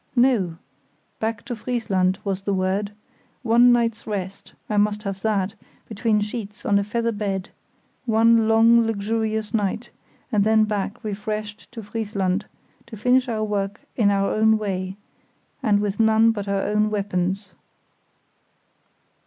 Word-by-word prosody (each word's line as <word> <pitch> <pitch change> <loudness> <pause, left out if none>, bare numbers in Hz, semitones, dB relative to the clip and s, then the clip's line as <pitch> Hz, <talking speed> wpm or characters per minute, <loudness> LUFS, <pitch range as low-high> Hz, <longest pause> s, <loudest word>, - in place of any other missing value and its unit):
No! 235 -10 +2 0.6
Back 220 -1 -3
to 245 - -4
Friesland, 200 -6 0
was 195 -1 -2
the 200 0 -1
word. 190 +2 -1 0.5
One 240 +1 +6
night's 230 -2 +1
rest—I 200 +1 -5
must 210 0 +1
have 195 -2 -4
that—between 210 +1 -2
sheets, 210 0 -6
on 200 0 +3
a - - 0
feather 230 +3 -1
bed; 200 -3 -3 0.6
one 225 0 +4
long, 230 +1 +5
luxurious 220 0 -2
night, 220 +2 -1 0.4
and 205 -2 +3
then 220 +1 +4
back 210 0 -3
refreshed 210 0 -5
to 225 -2 -7
Friesland, 205 -2 -2 0.4
to 225 -2 -9
finish 250 +4 +2
our 220 -2 -1
work 205 -1 -2
in 215 -4 +3
our 195 0 +1
own 220 0 +4
way, 190 -2 -3 0.6
and 210 -5 +3
with 205 0 -2
none 220 0 +5
but 205 -3 -5
our 200 -1 0
own 210 +1 +1
weapons. 195 -1 -2
210 Hz, 135 wpm, -23 LUFS, 200-225 Hz, 0.6 s, One